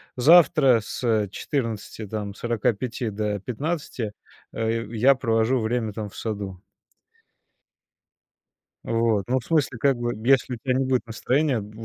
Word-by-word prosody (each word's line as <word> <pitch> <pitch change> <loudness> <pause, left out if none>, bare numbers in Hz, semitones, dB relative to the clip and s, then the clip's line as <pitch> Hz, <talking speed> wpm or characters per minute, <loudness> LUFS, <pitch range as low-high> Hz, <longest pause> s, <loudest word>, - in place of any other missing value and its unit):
завтра 140 -3 +6
с 110 -1 -1
14 115 -4 -4
там 105 -1 -4
45 120 +1 -2
до 105 0 -2
15, 125 - -4 0.4
э, 115 0 -2
я 120 +4 +5
провожу 115 0 +1
время 110 -1 -1
там 105 0 -5
в - - -15
саду. 100 -4 -4 2.3
Вот. 115 -3 +1
Ну, 130 +1 +1
в 120 - -13
смысле, 150 -6 +1
как 135 +1 +2
бы 120 0 -2
если 135 -1 +4
у - - -10
тя 130 - +1
не 130 +1 +1
будет 130 -3 0
настроения 130 +4 0
в 105 0 -9
115 Hz, 135 wpm, -24 LUFS, 110-130 Hz, 2.3 s, завтра